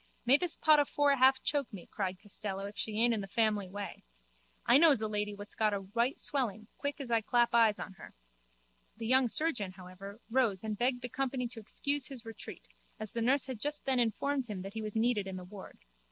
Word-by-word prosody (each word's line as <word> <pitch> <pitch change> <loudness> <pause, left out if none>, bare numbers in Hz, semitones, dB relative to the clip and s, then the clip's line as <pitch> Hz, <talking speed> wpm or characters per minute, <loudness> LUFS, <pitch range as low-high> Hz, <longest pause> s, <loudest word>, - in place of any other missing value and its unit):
May 260 +3 +6
this 355 0 +1
pot 305 -1 +5
of 290 - +2
four 290 -1 +3
half 265 0 +4
choke 285 -3 0
me, 195 -5 -9
cried 190 -3 -4
Costello, 200 -1 -4
if 205 +1 -8
she 210 +3 -2
aint 235 +1 +4
in 215 - -1
the 195 - -6
family 210 -1 +1
way. 205 +1 -7 0.6
I 245 +4 +7
knows 310 -6 +6
a 220 - -1
lady 210 -1 -2
what's 205 +1 -6
got 215 -2 +1
a 195 - -3
white 235 +7 -1
swelling 220 -7 -2
quick 285 +1 -3
as 265 -4 -6
I 230 -1 +3
claps 240 +2 +2
eyes 225 -3 +4
on - - -6
her. - - -12 0.8
The 225 - -5
young 260 +2 +4
surgeon, 235 - 0
however, 190 +3 -10
rose 225 -7 +2
and 215 -1 -2
begged 245 +2 0
the 245 - -3
company 255 -1 -2
to 235 - -9
excuse 280 +5 -1
his 255 -5 -10
retreat 225 -1 -9 0.3
as 215 -2 -6
the 235 - -3
nurse 260 +4 +3
had 260 -4 -6
just 295 +4 -3
then 265 -2 +2
informed 260 +3 0
him 200 -4 -5
that 195 +1 -7
he 220 - -4
was 215 0 -5
needed 220 -3 +1
in 190 - -5
the 180 -1 -7
ward. 190 +1 -11
225 Hz, 225 wpm, -32 LUFS, 205-260 Hz, 0.8 s, I